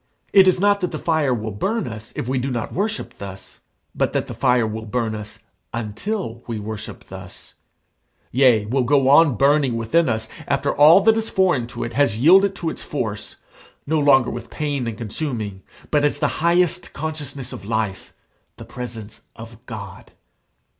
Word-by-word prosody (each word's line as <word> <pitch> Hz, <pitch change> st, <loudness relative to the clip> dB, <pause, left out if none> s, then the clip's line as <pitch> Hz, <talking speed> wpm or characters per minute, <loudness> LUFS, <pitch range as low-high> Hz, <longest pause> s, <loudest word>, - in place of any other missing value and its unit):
It 195 Hz, -1 st, +7 dB
is 185 Hz, -, +4 dB
not 205 Hz, +1 st, +3 dB
that 180 Hz, -2 st, -1 dB
the -, -, -5 dB
fire 160 Hz, -5 st, +1 dB
will 110 Hz, -3 st, -2 dB
burn 200 Hz, -, -2 dB
us 110 Hz, -1 st, -8 dB
if -, -, -4 dB
we 130 Hz, 0 st, 0 dB
do 130 Hz, +2 st, -2 dB
not 120 Hz, -3 st, -3 dB
worship 205 Hz, +3 st, -3 dB
thus; 95 Hz, -1 st, -9 dB, 0.3 s
but -, -, 0 dB
that -, -, 0 dB
the -, -, -7 dB
fire 125 Hz, -3 st, +2 dB
will 110 Hz, 0 st, -5 dB
burn 115 Hz, 0 st, -1 dB
us 110 Hz, +1 st, -8 dB, 0.4 s
until 115 Hz, -, -4 dB
we 115 Hz, -2 st, -3 dB
worship 105 Hz, 0 st, -7 dB
thus; -, -, -11 dB, 0.8 s
yea, 125 Hz, -5 st, +4 dB
will 130 Hz, +5 st, 0 dB
go 135 Hz, +1 st, +3 dB
on 145 Hz, -2 st, +6 dB
burning 140 Hz, 0 st, +3 dB
within 140 Hz, +7 st, +2 dB
us 110 Hz, -1 st, -2 dB, 0.2 s
after 140 Hz, 0 st, 0 dB
all 155 Hz, +6 st, +7 dB
that 220 Hz, +2 st, +4 dB
is 225 Hz, 0 st, -2 dB
foreign 180 Hz, -11 st, +2 dB
to 120 Hz, 0 st, -6 dB
it 120 Hz, -, -5 dB
has 135 Hz, -5 st, +2 dB
yielded 190 Hz, -, +5 dB
to 165 Hz, -4 st, -3 dB
its -, -, -7 dB
force, 110 Hz, -8 st, -4 dB, 0.5 s
no 155 Hz, +2 st, +1 dB
longer 135 Hz, -4 st, +4 dB
with 120 Hz, -, -7 dB
pain 145 Hz, -5 st, -2 dB
and 110 Hz, -2 st, -4 dB
consuming, 110 Hz, -4 st, -4 dB, 0.3 s
but 150 Hz, -1 st, +3 dB
as 145 Hz, -, +1 dB
the 150 Hz, -, +1 dB
highest 175 Hz, +1 st, +2 dB
consciousness 145 Hz, -4 st, -5 dB
of -, -, -8 dB
life, 110 Hz, -2 st, -3 dB, 0.5 s
the -, -, -10 dB
presence 115 Hz, -4 st, -8 dB
of 115 Hz, 0 st, -12 dB
God. 100 Hz, -5 st, -9 dB
130 Hz, 180 wpm, -21 LUFS, 110-155 Hz, 0.8 s, It